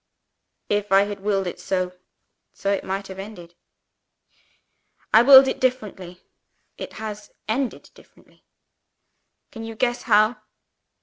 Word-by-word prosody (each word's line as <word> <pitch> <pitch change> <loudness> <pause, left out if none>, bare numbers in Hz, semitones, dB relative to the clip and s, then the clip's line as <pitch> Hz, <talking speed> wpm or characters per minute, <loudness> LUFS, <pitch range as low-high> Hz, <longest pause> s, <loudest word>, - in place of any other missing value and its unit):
"If 205 0 -1
I 195 +1 +6
had 205 0 -5
willed 195 -1 -1
it 175 - -6
so 185 -1 -2 0.6
so 200 - -2
it 200 - -1
might 195 +1 -4
have 190 0 -9
ended. 195 -4 -10 1.6
I 220 - +8
willed 265 +1 +9
it - - -2
differently. 205 -8 -3 0.5
It - - -8
has 210 -1 -7 0.2
ended 250 +3 -3
differently. - - -23 1.1
Can 225 - -9
you 225 0 -7
guess 240 +1 -1
how?" 215 +1 +3
205 Hz, 125 wpm, -23 LUFS, 195-225 Hz, 1.6 s, willed